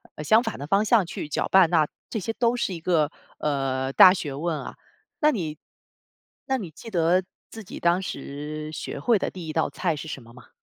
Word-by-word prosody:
呃， 150 Hz, -, -6 dB
相 220 Hz, +9 st, +5 dB
反 -, -, -4 dB
的 140 Hz, -, -6 dB
方 195 Hz, +6 st, +2 dB
向 215 Hz, -4 st, +4 dB
去 155 Hz, -, -6 dB
搅 -, -, -1 dB
拌， 190 Hz, -3 st, +6 dB
那 160 Hz, -3 st, +3 dB, 0.2 s
这 220 Hz, -, -2 dB
些 225 Hz, +4 st, -3 dB
都 235 Hz, +1 st, +1 dB
是 200 Hz, -6 st, -1 dB
一 170 Hz, -, -6 dB
个， 160 Hz, -3 st, +1 dB, 0.3 s
呃， 135 Hz, -2 st, -1 dB
大 185 Hz, -, +9 dB
学 150 Hz, -7 st, -4 dB
问 160 Hz, +3 st, -2 dB
啊， -, -, -8 dB, 0.4 s
那 300 Hz, 0 st, +4 dB
你 160 Hz, -, -3 dB, 0.9 s
那 265 Hz, -, 0 dB
你 185 Hz, -10 st, -7 dB
记 225 Hz, -, -11 dB
得 180 Hz, 0 st, +2 dB, 0.3 s
自 225 Hz, -, -8 dB
己 185 Hz, -, -9 dB
当 175 Hz, +2 st, +2 dB
时， 150 Hz, -1 st, -6 dB
学 145 Hz, -, -5 dB
会 225 Hz, +7 st, +3 dB
的 -, -, -1 dB
第 180 Hz, -3 st, -8 dB
1 155 Hz, -, -4 dB
道 160 Hz, -, +1 dB
菜 170 Hz, -4 st, -1 dB
是 150 Hz, -, -7 dB
什 140 Hz, -4 st, -6 dB
么 115 Hz, +1 st, -16 dB
吗？ 125 Hz, -, -15 dB
165 Hz, 230 characters per minute, -25 LUFS, 150-195 Hz, 0.9 s, 大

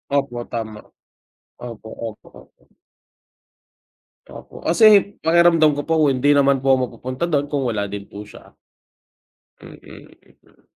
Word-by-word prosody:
Opo 135 Hz, -4 st, -2 dB
tama, 110 Hz, -2 st, -6 dB, 0.8 s
opo, 115 Hz, -2 st, -10 dB, 0.2 s
opo, 110 Hz, -, -14 dB
opo. -, -, -26 dB, 1.6 s
Opo, -, -, -13 dB
kasi 205 Hz, +2 st, +5 dB
pakiramdam 165 Hz, -2 st, +3 dB
ko 145 Hz, -, -4 dB
po 160 Hz, -3 st, +2 dB
hindi 135 Hz, +2 st, +2 dB
naman 140 Hz, -1 st, +3 dB
po 135 Hz, 0 st, +2 dB
mapupunta 130 Hz, +4 st, -3 dB
du'n 145 Hz, -3 st, 0 dB
kung 145 Hz, -1 st, -3 dB
wala 105 Hz, -3 st, -2 dB
din 100 Hz, 0 st, -8 dB
po 105 Hz, +1 st, -10 dB
siya. 105 Hz, -, -17 dB, 1.1 s
Mm, -, -, -13 dB, 0.7 s
mm. -, -, -29 dB
140 Hz, 120 wpm, -20 LUFS, 115-155 Hz, 1.6 s, kasi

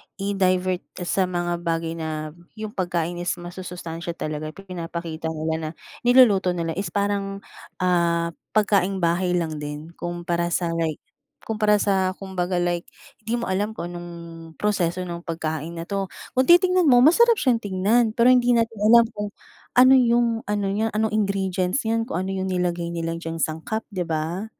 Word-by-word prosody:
i-divert 185 Hz, -2 st, +1 dB, 0.2 s
sa 185 Hz, +1 st, +2 dB
mga 175 Hz, -1 st, -2 dB
bagay 165 Hz, 0 st, -1 dB
na 155 Hz, -1 st, -4 dB, 0.2 s
yung 215 Hz, -1 st, -6 dB
pagkain 175 Hz, -4 st, -2 dB
is 175 Hz, 0 st, +1 dB
masusustansiya 175 Hz, -1 st, -7 dB
talaga, 155 Hz, 0 st, -5 dB
pinapakita 170 Hz, -4 st, -6 dB
nila 160 Hz, 0 st, -2 dB
na 155 Hz, -, -4 dB, 0.4 s
niluluto 210 Hz, -8 st, +5 dB
nila 165 Hz, -1 st, -2 dB
is 195 Hz, -, 0 dB
parang, 200 Hz, -1 st, -1 dB, 0.4 s
ah, 170 Hz, -2 st, +2 dB, 0.2 s
pagkaing 195 Hz, -2 st, +2 dB
bahay 175 Hz, +2 st, +1 dB
lang 160 Hz, -3 st, -1 dB
din. 150 Hz, +2 st, -6 dB
Kumpara, 175 Hz, 0 st, -2 dB
sa 175 Hz, -2 st, +1 dB
like, 160 Hz, -2 st, -2 dB, 0.4 s
kumpara 215 Hz, -1 st, +2 dB
sa 190 Hz, -2 st, +2 dB
kumbaga, 190 Hz, -2 st, -3 dB
like 175 Hz, -1 st, -1 dB, 0.3 s
di 225 Hz, +1 st, -2 dB
mo 235 Hz, -4 st, -2 dB
alam 205 Hz, +3 st, -1 dB
kung 175 Hz, -4 st, -5 dB
anong 175 Hz, 0 st, -7 dB, 0.5 s
proseso 185 Hz, -2 st, 0 dB
ng 175 Hz, -1 st, -7 dB
pagkain 160 Hz, 0 st, -3 dB
na 165 Hz, -, -5 dB
'to, 195 Hz, +2 st, -3 dB, 0.3 s
kung 260 Hz, -, +3 dB
titingnan 360 Hz, -1 st, +5 dB
mo, 245 Hz, -2 st, +6 dB
masarap 465 Hz, -, +6 dB
siyang 245 Hz, -5 st, +3 dB
tignan, 210 Hz, +3 st, +1 dB
pero 235 Hz, +1 st, +5 dB
hindi 245 Hz, -1 st, +4 dB
natin 230 Hz, -2 st, 0 dB
alam 230 Hz, +3 st, +7 dB
kung 205 Hz, 0 st, -4 dB, 0.5 s
ano 255 Hz, +1 st, +7 dB
yung, 235 Hz, -2 st, +3 dB
ano 205 Hz, -1 st, 0 dB
niya, 215 Hz, +3 st, 0 dB
ano 220 Hz, +1 st, +1 dB
ingredients 190 Hz, 0 st, 0 dB
niyan, 225 Hz, 0 st, +1 dB
kung 180 Hz, -7 st, -3 dB
ano 190 Hz, -, -4 dB
yung 190 Hz, -, -2 dB
nilagay 175 Hz, -1 st, -1 dB
nila 165 Hz, 0 st, -2 dB
diyang 165 Hz, -1 st, -5 dB
sangkap, 160 Hz, +9 st, -2 dB
'di 185 Hz, -4 st, -3 dB
ba, 165 Hz, +5 st, -2 dB
185 Hz, 160 wpm, -23 LUFS, 170-210 Hz, 0.5 s, alam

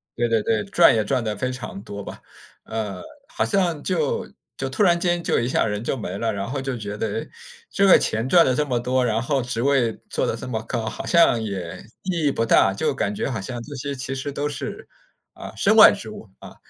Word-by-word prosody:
对 120 Hz, 0 st, 0 dB
对 115 Hz, -2 st, +1 dB
对， 110 Hz, -1 st, 0 dB
赚 -, -, +5 dB
也 110 Hz, -, +1 dB
赚 130 Hz, -3 st, 0 dB
得 105 Hz, -2 st, -2 dB
非 125 Hz, +5 st, -2 dB
常 125 Hz, -5 st, -7 dB
多 100 Hz, -1 st, -7 dB
吧。 -, -, -9 dB, 0.4 s
呃 105 Hz, -4 st, -4 dB, 0.3 s
好 330 Hz, +1 st, -2 dB
像 175 Hz, -7 st, 0 dB
就 160 Hz, -6 st, -1 dB, 0.3 s
就 135 Hz, -, -3 dB
突 135 Hz, +10 st, +1 dB
然 175 Hz, -3 st, +4 dB
间 175 Hz, -1 st, 0 dB
就 -, -, +1 dB
一 120 Hz, -, -1 dB
下 130 Hz, -, +1 dB
人 105 Hz, 0 st, -3 dB
就 135 Hz, -, -2 dB
没 95 Hz, -5 st, -5 dB
了， 115 Hz, -1 st, 0 dB
然 100 Hz, 0 st, -4 dB
后 135 Hz, +1 st, -3 dB
就 135 Hz, -2 st, -3 dB
觉 105 Hz, -2 st, -5 dB
得 110 Hz, -, -1 dB
诶， 110 Hz, +2 st, -4 dB, 0.4 s
这 200 Hz, -, +2 dB
个 -, -, +8 dB
钱 110 Hz, +4 st, 0 dB
赚 170 Hz, +2 st, +6 dB
了 130 Hz, -, +2 dB
这 150 Hz, -, +1 dB
么 125 Hz, -4 st, -1 dB
多， 125 Hz, +2 st, 0 dB
然 110 Hz, -2 st, 0 dB
后 135 Hz, +3 st, 0 dB
职 120 Hz, -1 st, -2 dB
位 130 Hz, -5 st, +1 dB
做 -, -, +1 dB
得 -, -, -1 dB
这 -, -, -6 dB
么 110 Hz, -3 st, -3 dB
高， 115 Hz, 0 st, -3 dB
好 -, -, -5 dB
像 170 Hz, -9 st, +4 dB
也 95 Hz, -6 st, -5 dB, 0.2 s
意 175 Hz, -5 st, -1 dB
义 140 Hz, -, +3 dB
不 115 Hz, -, -1 dB
大， 95 Hz, -3 st, +4 dB
就 100 Hz, -, 0 dB
感 100 Hz, +1 st, -2 dB
觉 -, -, -2 dB
好 110 Hz, -, -3 dB
像 120 Hz, +4 st, -5 dB
这 145 Hz, -, -9 dB
些 140 Hz, +2 st, -4 dB
其 130 Hz, +1 st, -3 dB
实 135 Hz, +2 st, -4 dB
都 145 Hz, +1 st, -2 dB
是 140 Hz, -2 st, -6 dB, 0.5 s
啊 -, -, -10 dB
身 -, -, +3 dB
外 -, -, +10 dB
之 -, -, -6 dB
物， -, -, -11 dB
啊。 -, -, -12 dB
125 Hz, 260 characters per minute, -23 LUFS, 110-140 Hz, 0.5 s, 外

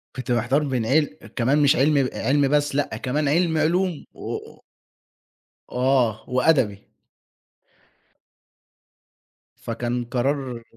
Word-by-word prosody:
كنت 130 Hz, -1 st, -5 dB
محتار 120 Hz, +5 st, +1 dB
بين 130 Hz, -5 st, -1 dB
عل 150 Hz, +6 st, +3 dB, 0.3 s
كمان 135 Hz, +5 st, +2 dB
مش 145 Hz, +1 st, +5 dB
عِلم 150 Hz, +1 st, +3 dB, 0.2 s
آآ، -, -, -4 dB
عِلمي 140 Hz, +1 st, +3 dB
بس، 145 Hz, 0 st, +1 dB
لأ 140 Hz, -6 st, -1 dB
كمان 140 Hz, +6 st, -1 dB
عِلمي 160 Hz, +2 st, +2 dB
علوم 175 Hz, +1 st, 0 dB
و -, -, -6 dB
و -, -, -10 dB, 1.1 s
وآه، 125 Hz, -4 st, +1 dB
وأدبي. 125 Hz, -6 st, +1 dB, 2.7 s
فكان 120 Hz, +1 st, -3 dB
قرار 125 Hz, 0 st, -2 dB
135 Hz, 110 wpm, -23 LUFS, 120-150 Hz, 2.7 s, مش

